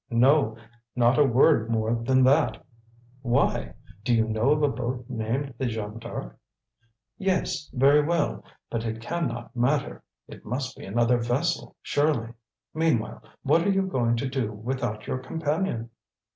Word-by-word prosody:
"No, 120 -1 +3 0.4
not 120 +2 +3
a - - +7
word 125 -2 +4
more 110 0 +1
than 130 +3 +2
that. 130 -4 +3 0.6
Why? 120 -2 0 0.3
Do 120 +1 +2
you 110 -1 +2
know 110 +4 +1
of 150 0 +3
a - - +5
boat 125 -2 -3
named 125 +4 -3
the 130 - 0
Jeanne 110 -1 -4
D'Arc?" 115 - -7 0.8
"Yes, 185 -6 -1
very 140 +3 +5
well; 165 0 0 0.3
but 115 -1 -2
it 110 -1 -3
can 170 +7 -2
not 120 +1 -7
matter. 125 +4 0 0.3
It - - -12
must 125 +3 -4
be - - -10
another 120 +4 +2
vessel, 120 +8 -1
surely. 145 -6 0 0.4
Meanwhile, 155 -8 0 0.2
what 155 +5 +4
are 200 - +1
you 195 0 +2
going 120 -9 +1
to 120 +4 -2
do 130 -4 -2
without 110 0 -4
your 130 - -2
companion?" 145 -3 -2
125 Hz, 155 wpm, -26 LUFS, 115-145 Hz, 0.8 s, a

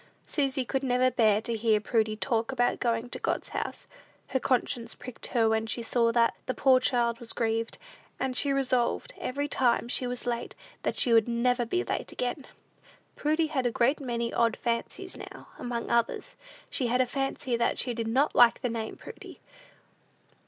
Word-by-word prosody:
Susy 270 -3 0
could 270 +2 -1
never 255 -1 +2
bear 215 -4 +3
to 235 - -2
hear 220 -1 +2
Prudy 215 0 0
talk 230 +1 -1
about 245 -2 +1
going 230 0 0
to - - -4
God's - - -2
house. - - -4 0.4
Her 265 - +1
conscience 245 -2 0
pricked 250 -1 -7
her 230 -3 +2
when 220 0 +1
she 230 +2 -2
saw 230 0 +2
that 230 0 +3
the 255 - -1
poor 260 -2 +5
child 240 -2 +1
was 235 -1 -4
grieved; 225 0 -1 0.4
and 265 -1 -1
she 280 +2 +2
resolved, 255 -3 0
every 285 +3 -2
time 245 -4 +1
she 250 +1 0
was 245 0 -3
late, 240 -1 -3 0.3
that - - -2
she 240 - +3
would 225 -1 +5
never 240 0 +1
be 360 +9 0
late - - -3
again. 250 +2 -3 0.7
Prudy 310 +2 +1
had 270 -5 0
a - - 0
great 250 +5 +2
many 235 -3 -2
odd 230 -1 +2
fancies 250 +11 -3
now: - - -10
among 240 -1 -3
others, 235 - 0 0.4
she 250 - 0
had 250 +2 +1
a 255 - +4
fancy 270 -1 -2
that 235 0 +1
she 245 - +1
did 230 -1 -3
not 265 +6 +2
like 240 -1 +6
the 250 - 0
name 225 -1 -4
of - - -15
Prudy. - - -10
245 Hz, 190 wpm, -28 LUFS, 230-260 Hz, 0.7 s, like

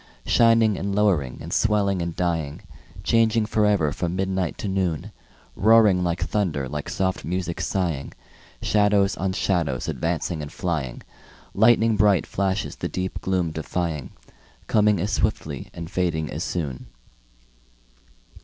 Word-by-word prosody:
Shining 115 -3 +4
and 100 0 -2
lowering 90 -12 +1
and - - -6
swelling 100 -4 +2
and 85 -1 -3
dying, 80 -5 -2 0.4
Changing 115 0 +3
forever 105 -8 +2
from 85 +3 -3
midnight 95 -2 -1
to - - -4
noon; 95 -6 -1 0.4
Roaring 105 -4 +5
like 85 0 -1
thunder, 80 -10 -1
like 75 +1 -5
soft 95 -1 -1
music 85 +2 -3
sighing, 85 -8 -2 0.5
Shadows 105 -2 +3
on 95 +1 -2
shadows 85 -10 0
advancing 85 -1 -2
and 75 0 -7
flying, 75 -9 -3 0.5
Lighning 110 +1 +4
bright 100 -6 +4
flashes 100 0 -2
the - - -3
deep 95 0 -4
gloom 90 -3 0
defying, 80 -2 -3 0.6
Coming 105 -2 +3
as 100 +5 -1
swiftly - - -2
and 85 -1 -7
fading 85 -4 -1
as - - -3
soon. 75 -8 -4
95 Hz, 130 wpm, -24 LUFS, 80-105 Hz, 0.6 s, Roaring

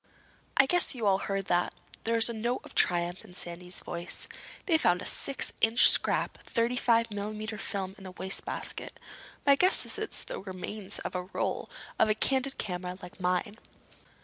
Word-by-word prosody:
"I 270 - +7
guess 355 0 +2
you 235 -3 -3
all 195 -1 +4
heard 195 -1 -2
that." 175 -1 0 0.3
There 230 +1 +1
was 225 - +6
a 235 - -3
note 235 +3 -2
of - - -12
triumph 175 +1 +1
in 180 - -15
Sandy's 180 +1 -4
voice. 175 0 -4 0.4
"They 330 -4 +3
found 180 - +3
a - - -6
six 275 - +3
inch 225 +2 +7
scrap - - +2
of - - -19
thirty 235 +2 +1
five 230 -2 +2
millimeter 215 +1 -4
film 195 -3 -3
in - - -13
the - - -6
wastebasket. 190 +1 -2 0.5
My 280 - +7
guess 365 +7 +3
is - - -4
it's 435 - -4
the - - -6
remains 195 +1 -4
of - - -5
a 180 - -1
roll 190 - -3 0.3
for - - +4
a 215 - +3
candid 265 +3 +1
camera 180 -1 -4
like 180 0 -11
mine." 180 +3 -1
205 Hz, 185 wpm, -29 LUFS, 180-235 Hz, 0.5 s, I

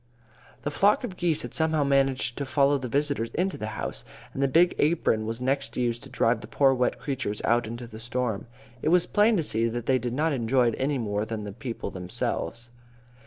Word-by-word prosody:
The 145 - -2
flock 200 - +3
of 210 -7 -5
geese 170 -4 0
had - - -7
somehow 160 -2 +2
managed 135 -3 +2
to 140 - -2
follow 140 0 +3
the 130 - -4
visitors 140 -2 0
into 185 +1 0
the 110 - -5
house, - - -4 0.3
and 135 - -3
the 140 - +4
big 170 +6 +4
apron 145 -8 +2
was 115 +1 -3
next 135 +2 -1
used 120 -1 0
to 135 - -10
drive 115 -3 +1
the - - -9
poor 135 -2 +3
wet 125 -1 +1
creatures 130 -7 -3
out 120 0 +2
into 120 +2 -6
the 110 -1 -10
storm. 120 -2 -2 0.3
It - - +1
was 175 +1 +4
plain 210 +1 +3
to 165 - +1
see 115 -4 +1
they 120 +3 0
did 120 0 -3
not 155 +4 +1
enjoy 125 0 +2
it 115 - -3
any 140 +1 +1
more 105 -3 -1
than 110 -1 -4
the 100 - -5
people 115 +1 -5
themselves. 95 +4 -2
130 Hz, 215 wpm, -27 LUFS, 115-145 Hz, 0.3 s, the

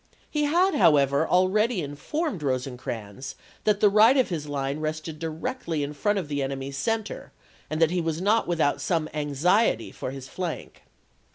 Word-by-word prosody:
He 300 -1 +1
had, 355 +6 +3
however, 145 - +4
already 190 +2 +2
informed 185 - -3
Rosecrans 125 -3 -4 0.3
that 210 -1 +2
the 210 - +7
right 220 +6 +6
of 260 - +3
his 155 -5 -3
line 140 0 -2
rested 155 0 -4
directly 165 - -3
in 145 +1 -4
front 205 +8 0
of 180 -6 -2
the 145 -1 -2
enemy's 135 0 -4
center 225 +7 -3 0.4
and 155 - -2
that 165 -1 +4
he 180 -1 0
was 160 -1 -2
not 210 +5 +2
without 160 -5 +1
some 165 -4 0
anxiety 155 +9 +1
for - - -5
his 135 -1 -8
flank. 175 +2 -6
160 Hz, 165 wpm, -26 LUFS, 145-210 Hz, 0.4 s, the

